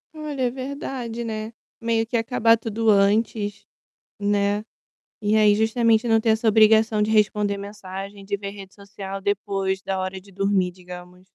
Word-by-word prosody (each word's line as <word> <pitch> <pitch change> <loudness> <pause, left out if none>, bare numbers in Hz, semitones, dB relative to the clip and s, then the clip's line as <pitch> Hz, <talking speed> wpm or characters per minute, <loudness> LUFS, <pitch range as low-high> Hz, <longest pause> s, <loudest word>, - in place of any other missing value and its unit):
Olha, 300 -3 -4
é 245 - +1
verdade, 255 -3 -5
né, 220 0 -4 0.3
meio 230 -1 +1
que 235 +2 -5
acabar 230 -1 +3
tudo 225 0 -3
antes, 205 0 +1 0.5
né, 205 +1 0 0.6
e 210 +1 +2
aí 210 -1 +5
justamente 225 +1 +2
não 225 -1 +4
ter 225 - 0
essa 220 +1 +2
obrigação 220 0 +4
de 210 - +1
responder 210 -1 +2
mensagem, 200 0 -8
de 200 +1 -1
ver 200 0 -6
rede 195 -1 -11
social 195 -1 -8
depois 195 -1 -1
da 195 -1 -3
hora 185 0 -4
de 195 +1 -19
dormir, 195 -1 +1
digamos. 180 0 -12
210 Hz, 160 wpm, -23 LUFS, 195-225 Hz, 0.6 s, aí